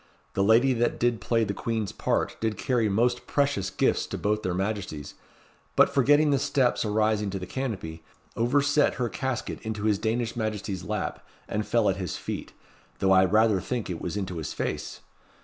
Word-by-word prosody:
The 100 - +1
lady 115 +6 +5
that 120 0 0
did 120 -3 +1
play 115 +2 +1
the 100 -2 -1
Queen's 110 -2 -2
part - - -1
did 110 -2 -1
carry 120 -4 +1
most 120 +4 +1
precious 140 -9 +1
gifts - - +1
to - - -4
both 105 +1 0
their 95 -3 -2
Majesties, 95 -7 -3 0.6
but - - +5
forgetting 145 +3 +4
the 140 - +3
steps 135 -2 +1
arising 105 -1 +1
to 95 - -3
the 90 - -5
canopy, 95 -11 -4 0.3
overset 145 +5 +2
her 125 -2 -1
casket 125 +5 -3
into 110 -2 -4
his 105 -2 +2
Danish 115 +1 -1
Majesty's 105 -5 -3
lap, - - -3 0.2
and 105 0 -2
fell 115 -3 +2
at 95 - +1
his 90 -4 -4
feet, - - -5 0.5
though 95 - +2
I 95 0 +7
rather 105 0 +3
think 120 -1 -3
it 85 - -5
was 90 +4 -3
into 95 -3 -3
his 80 -3 -4
face. - - -4
110 Hz, 185 wpm, -27 LUFS, 100-120 Hz, 0.6 s, I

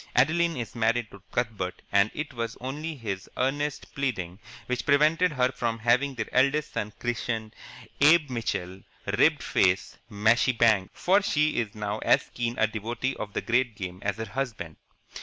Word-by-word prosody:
Adeline 165 +5 +3
is 115 -4 -5
married 115 0 0
to 100 - -13
Cuthbert, 100 -6 -2
and 100 +1 +4
it 150 -2 -4
was 115 -2 -4
only 150 +5 -4
his 100 -8 -5
earnest 145 +3 -2
pleading 100 -10 -3 0.3
which 125 -1 -2
prevented 155 +5 +4
her 130 -2 +2
from 115 -3 -2
having 125 +5 +2
their 115 -2 -2
eldest 140 +4 +2
son 105 - -3
christened 115 -2 -3 0.4
Abe 150 -1 +5
Mitchell 95 -6 -3 0.2
Ribbed - - +3
Faced 95 +1 +1
Mashie 115 +3 +2
Banks, 110 -5 +2
for 195 +3 +4
she 155 -6 +1
is 110 -3 -3
now 105 0 -3
as - - +2
keen 120 0 -2
a 110 - +4
devotee 115 +4 -3
of 105 -1 -6
the - - -1
great 120 -1 +1
game 90 -2 -6
as 100 -1 -2
her 110 - -3
husband. 110 - -4
120 Hz, 165 wpm, -27 LUFS, 105-135 Hz, 0.4 s, Abe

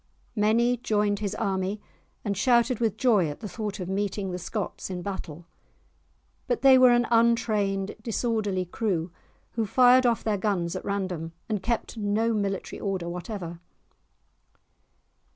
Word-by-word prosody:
Many 230 +3 +3
joined 210 -3 0
his 210 -1 -3
army, 195 -1 -1 0.5
and 200 -1 -1
shouted 235 +3 +3
with 220 -3 0
joy 210 -11 +3
at 145 - -7
the 215 - -6
thought 210 0 -5
of 180 - -4
meeting 195 0 -2
the 180 - -4
Scots 200 +2 -4
in 180 -2 -5
battle. 175 -4 -6 1.0
But - - -1
they 270 -1 +8
were 255 -1 +8
an 240 0 +4
untrained 215 -4 +2
disorderly 220 -4 -1
crew, 180 -3 -2 0.4
who 225 -2 -2
fired 255 +3 +5 0.2
their 210 -3 0
guns 185 -4 -1
off - - -2
at - - -14
random 185 -5 -3
and 210 -3 -2
kept 235 +2 -2
no 215 +2 +1
military 200 -2 -2
order 190 -4 -2
whatever. 175 -1 -6
205 Hz, 145 wpm, -26 LUFS, 190-230 Hz, 1.0 s, they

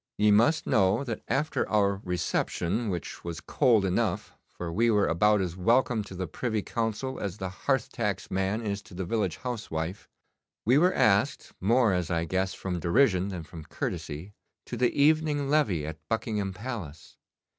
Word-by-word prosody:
Ye 105 0 +4
must 120 +10 +4
know 95 +5 +3
that 120 -5 -4
after 150 +3 0
our 100 -2 +2
reception 90 +4 -1
which 90 -3 -5
was 85 -2 -5
cold 115 - +3
enough, 90 - -1 0.2
for 85 -2 -6
we 115 +6 +3
were 105 -2 +3
about 105 +5 +3
as 90 -2 -3
welcome 115 +4 +2
to 95 - -9
the 95 +1 -3
Privy 110 +5 -2
Council 115 +3 -2
as 100 -1 -4
the 95 -2 -4
hearth 135 +8 -1
tax 105 -4 -3
man 95 +4 0
is 100 -1 -2
to 90 - -14
the 95 0 -3
village 95 -4 -1
housewife 100 -8 -4 0.6
we 125 +6 +5
were 180 +3 +3
asked, 110 +7 +2
more 115 +1 +4
as 90 -2 -1
I 85 -1 0
guess 95 +3 -1
from 90 -2 -3
derision 95 - +3
than 90 -4 -5
from 80 0 -10
courtesy, 80 +4 -5 0.3
to - - -5
the 125 -1 +3
evening 150 -1 +3
levee 105 - +2
at 80 0 -6
Buckingham 105 -3 -1
Palace. 95 - -7
100 Hz, 170 wpm, -28 LUFS, 90-120 Hz, 0.6 s, we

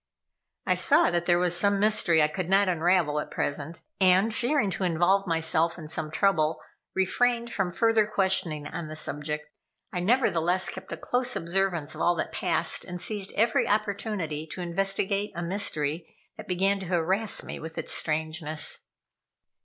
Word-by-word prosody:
I - - +3
saw 310 - +4
that 175 0 -1
there 175 -1 +4
was 175 0 +1
some 200 +2 +2
mystery 195 -6 +4
I - - +4
could 165 +3 -4
not 195 +1 +4
unravel 170 -3 +1
at - - -5
present, 150 +3 -4 0.2
and 190 +3 +4
fearing 245 -3 0
to 190 +2 -4
involve 185 +3 +2
myself 165 0 +1
in 155 -3 -9
some 155 0 -3
trouble, 160 -2 +1 0.4
refrained 235 +5 0
from 195 -3 -1
further 225 +3 +2
questioning 190 -7 +1
on 155 +2 -6
the 155 - -7
subject. 150 0 -3 0.5
I 180 - -2
nevertheless 180 -4 +1
kept 190 0 -9
a - - -4
close 250 0 -1
observance 170 -3 -1
of - - -7
all 175 - +3
that - - -3
passed, - - +1
and 180 0 -7
seized 205 0 -2
every 225 +2 +2
opportunity 200 -7 -2
to 180 - -7
investigate 195 +3 0
a 175 - -4
mystery 165 -4 -1 0.2
that - - -11
began 195 +2 +1
to 190 - -7
harass 185 +5 +1
me - - -7
with 160 +1 -9
its - - 0
strangeness. 155 0 -2
180 Hz, 165 wpm, -27 LUFS, 160-200 Hz, 0.5 s, saw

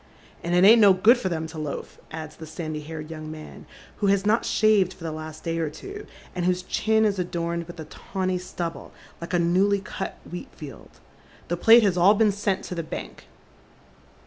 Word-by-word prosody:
" - - -26
And 175 +1 0
it 180 - +5
ain't 225 +3 +8
no 200 -2 +8
good 220 +7 +5
for 190 - -2
them 160 -2 -2
to 160 0 -8
loaf," 150 -2 -6
adds 155 -1 -7
the 160 - -10
sandy 155 -1 -5
haired 155 +1 -8
young 155 -1 -7
man, 155 0 -10 0.3
who 205 - 0
has 200 0 +2
not 220 +3 +2
shaved 210 -4 +3
for - - -14
the 165 - -3
last 155 0 -8
day 165 -1 -2
or 160 -2 -1
two, 405 - -9 0.3
and 180 - -3
whose 180 0 +1
chin 220 +3 +1
is 200 -3 0
adorned 170 -1 -2
with 175 -1 -10
a 160 - -6
tawny 185 +1 -3
stubble 175 -2 -6 0.3
like 170 +2 -3
a - - +4
newly 185 +4 +3
cut 195 0 -6
wheat 175 - -7
field. 150 -4 -11 0.2
" - - -26
The 175 - -1
plate 230 +5 +7
has 190 -3 +2
all 190 +4 +6
been 215 0 +4
sent 200 -1 -1
to - - -6
the 170 - -2
bank." 155 - -8
180 Hz, 215 wpm, -25 LUFS, 160-200 Hz, 0.3 s, ain't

